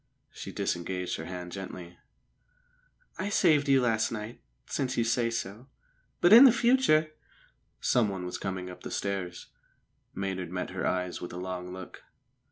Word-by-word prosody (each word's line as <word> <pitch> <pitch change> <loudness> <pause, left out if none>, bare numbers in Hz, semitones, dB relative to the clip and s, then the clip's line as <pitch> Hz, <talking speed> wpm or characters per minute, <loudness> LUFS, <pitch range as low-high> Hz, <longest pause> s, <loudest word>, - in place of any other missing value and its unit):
She - - -8
disengaged 90 +1 -2
her 80 - -6
hand 90 0 -6
gently. 90 -2 -8 1.2
"I 190 +3 -1
saved 155 -8 +3
you 135 -1 +5
last 115 -2 +1
night 110 +1 -6 0.2
since 130 -3 -2
you 115 - +3
say 115 +1 +1
so. 115 +1 -5 0.5
But 175 +4 +6
in 250 +3 +11
future 235 -11 +3 0.4
" - - -43 0.2
Someone 100 -5 0
was 90 - -5
coming 95 -1 -4
up 90 - -10
the - - -7
stairs. 95 -3 -4 0.7
Maynard 95 -2 -3
met 90 +1 -4
her - - -2
eyes 90 -1 -2
with 90 - -6
a - - -6
long 90 0 -5
look. 95 -1 -9
95 Hz, 155 wpm, -29 LUFS, 90-130 Hz, 1.2 s, in